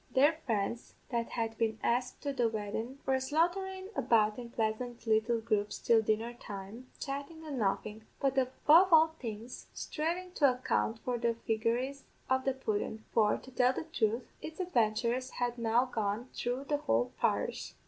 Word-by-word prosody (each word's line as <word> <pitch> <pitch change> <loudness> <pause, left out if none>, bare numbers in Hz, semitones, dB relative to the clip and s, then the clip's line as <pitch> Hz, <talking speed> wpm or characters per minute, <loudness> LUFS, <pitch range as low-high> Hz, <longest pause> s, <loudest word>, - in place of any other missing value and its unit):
Their 285 +5 +6
friends 225 +1 -2
that 235 -2 -1
had 225 -2 -3
been 220 -1 +1
asked 250 +1 0
to 285 -1 -1
the 240 -4 +2
weddin' 220 +4 -4
were 265 -1 +2
saunterin' 375 +7 0
about 220 -2 +3
in 240 -1 -7
pleasant 230 +1 -2
little 225 +1 +2
groups 210 -2 0
till 230 -1 +4
dinner 220 +2 0
time, 210 +2 -8
chattin' 285 +3 -5
an' 285 -4 -4
laughin'; 210 +2 -1
but, 275 -1 +1
above 300 +7 +5
all 320 0 +7
things, 230 0 -7
sthrivin' 350 +4 -3
to 280 -4 +5
account 240 -3 0
for 245 -1 -1
the 235 0 +1
figaries 240 +5 0 0.3
of 260 0 +2
the 270 - +2
pudden; 220 -3 -2
for, 210 -2 +4
to 260 - -13
tell 250 0 +3
the - - -3
truth, 225 +2 +1 0.2
its 315 +2 -8
adventures 245 -5 +1
had 245 -1 -1
now 230 +2 +3
gone 220 0 -2
through 245 +3 -2
the 290 +1 0
whole 120 - +1
parish. - - -1
240 Hz, 165 wpm, -32 LUFS, 220-270 Hz, 0.3 s, all